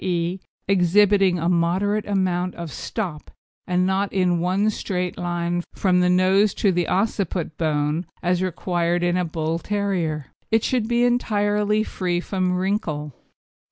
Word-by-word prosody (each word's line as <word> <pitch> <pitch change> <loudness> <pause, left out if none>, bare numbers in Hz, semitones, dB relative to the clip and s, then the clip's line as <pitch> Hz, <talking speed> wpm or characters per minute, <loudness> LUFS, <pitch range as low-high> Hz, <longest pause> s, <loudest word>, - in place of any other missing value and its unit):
e._ 175 +1 -1 0.3
exhibiting 195 0 +4
a 165 0 -1
moderate 180 +5 +1
amount 185 -2 0
of 170 -3 -6
stop 175 -6 -5 0.4
and 180 0 +1
not 190 +1 0
in 180 -3 +1
one 185 +4 +1
straight 180 -4 -2
line 175 0 -2
from 180 -2 +2
the 180 0 +3
nose 190 +3 +3
to 200 - +2
the 175 -2 0
occiput 190 -5 -1
bone 150 0 0 0.2
as 180 0 +1
required 175 -1 -1
in 175 0 +1
a 180 - +1
Bull 160 0 -2
terrier. 175 -8 -2 0.2
It 225 0 +2
should 245 -4 0
be 240 +1 +2
entirely 210 -3 +1
free 180 -4 -2
from 185 0 -1
wrinkle. 180 - -2
180 Hz, 145 wpm, -23 LUFS, 175-200 Hz, 0.4 s, exhibiting